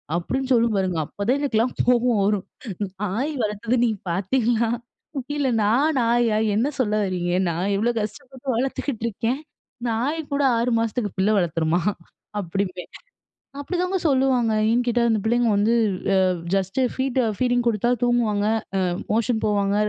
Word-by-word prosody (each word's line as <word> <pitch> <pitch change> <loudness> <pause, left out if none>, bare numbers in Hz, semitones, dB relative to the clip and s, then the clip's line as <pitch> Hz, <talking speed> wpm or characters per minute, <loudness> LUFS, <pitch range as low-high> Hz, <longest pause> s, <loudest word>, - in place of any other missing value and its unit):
அப்பிடின்னு 260 +10 -2
சொல்லும் 230 -2 +3
பாருங்க. 185 -3 0
அப்பதான் 215 - -1
எனக்குலாம் 250 -4 +1
கோபம் 245 -2 +3
வரும். 205 -1 +1 0.6
நாய் 230 +10 -1
வளர்த்தது 215 +4 -1
நீங்க 220 -5 0
பார்த்தீங்களா? 225 +5 +1 0.7
இல்ல 285 -2 +1 0.2
நான் 275 +9 +2
நாயா! 230 -1 +2 0.2
என்ன 235 +6 +2
சொல்ல 215 -5 +1
வர்றீங்க? 180 -2 -2 0.2
நான் 180 +5 -1
இவ்ளோ 230 +4 +1
கஷ்டப்பட்டு 255 +5 -7
வளர்த்துக்கிட்டு 260 -1 -2
இருக்கேன்! 230 +5 -2 0.5
நாய்கூட 285 +5 -1
6 235 +2 +1
மாசத்துக்கு 225 -1 -1
பிள்ள 195 +3 +2
வளர்த்துருமா? 165 -1 +1 0.6
அப்பிடிம்பேன். 185 0 -3 0.7
அப்பிடிதாங்க 360 +5 -1
சொல்லுவாங்க. 260 -4 +2 0.2
ஏன்னு 240 +2 +2
கேட்டா, 240 0 +2
அந்த 220 -2 +2
பிள்ளைங்க 240 0 +2
வந்து 210 +3 +3 0.4
அ - - +4 0.4
ஜஸ்ட்டு 195 +6 0
ஃபீட், 260 -1 0 0.2
ஃபீடிங் 245 -1 +1
குடுத்தா 235 +1 +1
தூங்குவாங்க. 230 -4 +1 0.4
அ - - 0 0.2
மோஷன் 225 +1 +1
போவாங்க. 200 -1 +1
230 Hz, 135 wpm, -23 LUFS, 205-250 Hz, 0.7 s, அ